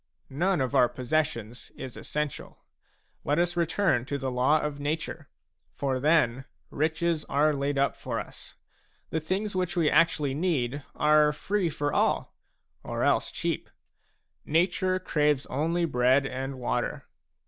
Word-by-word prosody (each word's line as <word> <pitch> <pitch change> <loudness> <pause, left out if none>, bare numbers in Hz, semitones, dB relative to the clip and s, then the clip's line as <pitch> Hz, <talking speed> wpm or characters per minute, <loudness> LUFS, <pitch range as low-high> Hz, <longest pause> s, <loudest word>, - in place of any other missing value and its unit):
None 175 +3 +1
of 130 0 -1
our 125 -3 +5
possessions 125 -4 -2
is 130 -2 -7
essential. 150 -2 -5 0.6
Let 145 +1 +1
us 175 0 +1
return 170 -5 +1
to 140 +1 -2
the 135 -1 -3
law 130 +5 +3
of 150 -1 -3
nature; 150 +3 -3 0.5
for 135 -2 -1
then 135 -4 +2 0.3
riches 160 +1 0
are 150 +2 +2
laid 140 0 -1
up 140 0 +2
for - - -4
us. - - -10 0.6
The 160 - 0
things 190 +6 -2
which 180 -1 -1
we 160 -3 +3
actually 155 -4 +3
need 145 -4 -1
are 150 0 +4
free 185 +4 -1
for 145 -1 -2
all, - - +1 0.5
or - - -3
else - - +2
cheap; - - -3 0.7
nature 180 +3 +1
craves 150 -6 +1
only 165 +5 +1
bread 130 -1 +3
and 135 0 -4
water. 125 - -2
150 Hz, 140 wpm, -27 LUFS, 135-165 Hz, 0.7 s, our